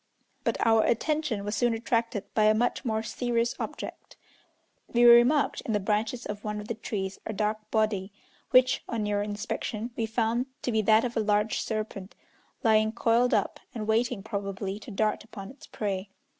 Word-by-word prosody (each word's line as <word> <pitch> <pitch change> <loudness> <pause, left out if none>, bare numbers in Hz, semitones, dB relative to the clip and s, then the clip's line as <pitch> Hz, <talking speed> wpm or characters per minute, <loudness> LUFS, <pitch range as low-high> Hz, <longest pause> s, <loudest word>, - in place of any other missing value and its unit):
But - - 0
our 225 -1 +5
attention 270 -3 0
was 205 +1 -2
soon 235 +2 +2
attracted 230 -2 -1
by 215 - +3
a 215 0 +5
much 245 +4 0
more 220 -3 -1
serious 235 0 0
object. - - -6 0.8
We 240 0 +3
remarked 240 +5 +6
in 225 - -3
the 210 - +2
branches 215 +4 -1
of 205 0 -5
one 210 0 -3
of 210 - -8
the 230 - -2
trees 200 -3 -4
a 220 - -3
dark 215 +1 -2
body, 215 -3 0 0.4
which, 255 0 +4
on 230 -2 -1
nearer 205 -1 0
inspection, 210 +2 -4
we 225 - -1
found 230 +2 0 0.2
to 245 - 0
be 220 -1 +2
that 220 +3 +4
of 240 - -4
a - - +2
large 210 0 +1
serpent, 215 -3 -4 0.5
lying 220 -1 +4
coiled 235 +1 +3
up, 205 - -1 0.2
and 215 -2 -3
waiting, 225 -1 +1
probably, 200 -2 -4
to 215 - -11
dart 215 +1 0
upon 200 -2 -9
its 275 - -15
prey. 195 -2 -3
220 Hz, 180 wpm, -28 LUFS, 210-235 Hz, 0.8 s, remarked